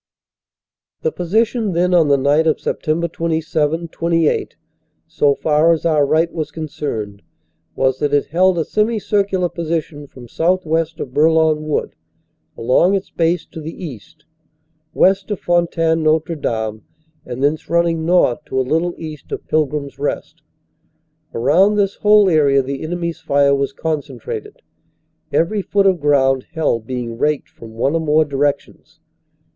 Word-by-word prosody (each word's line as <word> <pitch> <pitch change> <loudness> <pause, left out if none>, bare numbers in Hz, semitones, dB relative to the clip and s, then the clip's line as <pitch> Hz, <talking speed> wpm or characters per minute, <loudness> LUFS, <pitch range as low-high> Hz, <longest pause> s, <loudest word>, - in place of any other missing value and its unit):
The 475 - +1
position 220 - 0
then 180 +2 +1
on 165 -3 +4
the 140 -1 +4
night 145 +4 +2
of 155 - +2
Sept. 165 +2 -2
27 160 0 -1
28, 165 -1 0 0.5
so 145 -1 +1
far 155 +3 +3
as 165 - -3
our 150 -4 +3
right 160 +3 +1
was 155 -2 -3
concerned, 135 -10 -5 0.5
was 130 -1 +1
that 145 -1 0
it 145 -1 +2
held 185 +2 +2
a 160 - 0
semi 215 +2 0
circular 195 -3 0
position 160 -3 -4
from 125 -3 -13
southwest 165 +1 0
of 130 - -6
Bourlon 155 0 +3
Wood, 150 - -2 0.6
along 150 +11 +3
its 195 - -4
base 170 +1 0
to 160 - -8
the 160 +4 -7
east, 150 +3 -11 0.7
west 195 +2 +3
of 205 - -3
Fontaine 165 -2 +1
Notre 155 +1 +1
Dame, 110 -6 -3 0.4
and 125 +2 -5
thence 150 +2 0
running 170 -1 +1
north 165 -8 +2
to 130 - -2
a 130 - 0
little 165 +4 0
east 155 -3 -9
of - - -5
Pilgrim 150 -2 0
s 140 - -13
Rest. 145 - -4 0.9
Around 170 - +3
this 200 -1 0
whole 210 -1 +5
area 140 -5 +3
the 135 +1 -5
enemy 170 +1 -3
s - - -14
fire 140 0 +2
was 140 -1 0
concentrated, 420 - -5 0.7
every 200 +5 +1
foot 200 +1 +1
of 185 -4 +2
ground 135 -3 +2
held 115 -8 -1
being 120 -2 -5
raked 150 -1 0
from 115 -1 -13
one 135 +6 0
or 165 - 0
more 155 0 +3
directions. 145 0 -3
160 Hz, 150 wpm, -18 LUFS, 145-170 Hz, 0.9 s, whole